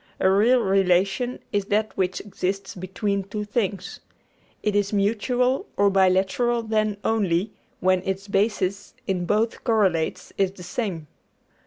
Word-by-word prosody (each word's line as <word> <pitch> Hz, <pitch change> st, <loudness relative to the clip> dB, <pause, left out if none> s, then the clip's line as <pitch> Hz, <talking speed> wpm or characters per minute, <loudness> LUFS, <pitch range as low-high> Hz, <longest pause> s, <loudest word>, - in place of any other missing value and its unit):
A 190 Hz, -, +4 dB
real 235 Hz, +6 st, +4 dB
relation 195 Hz, +5 st, +2 dB, 0.2 s
is 205 Hz, -1 st, +1 dB
that 210 Hz, +2 st, 0 dB
which 185 Hz, -1 st, -1 dB
exists 195 Hz, -1 st, -3 dB
between 195 Hz, +2 st, -2 dB
two 210 Hz, +2 st, -5 dB
things. 200 Hz, -3 st, -2 dB, 0.6 s
It 210 Hz, -1 st, 0 dB
is 205 Hz, -1 st, +1 dB
mutual 245 Hz, -, +1 dB
or 200 Hz, 0 st, +4 dB
bilateral 195 Hz, +5 st, +2 dB
then, 215 Hz, -2 st, 0 dB
only 200 Hz, -3 st, +1 dB, 0.3 s
when 185 Hz, 0 st, +3 dB
its 195 Hz, +1 st, -3 dB
basis 200 Hz, -1 st, -1 dB
in 180 Hz, -4 st, -1 dB
both 220 Hz, +4 st, 0 dB
correlates 195 Hz, -9 st, 0 dB
is 190 Hz, -1 st, +2 dB
the 180 Hz, -, -11 dB
same. 180 Hz, -6 st, -3 dB
200 Hz, 135 wpm, -24 LUFS, 190-215 Hz, 0.6 s, A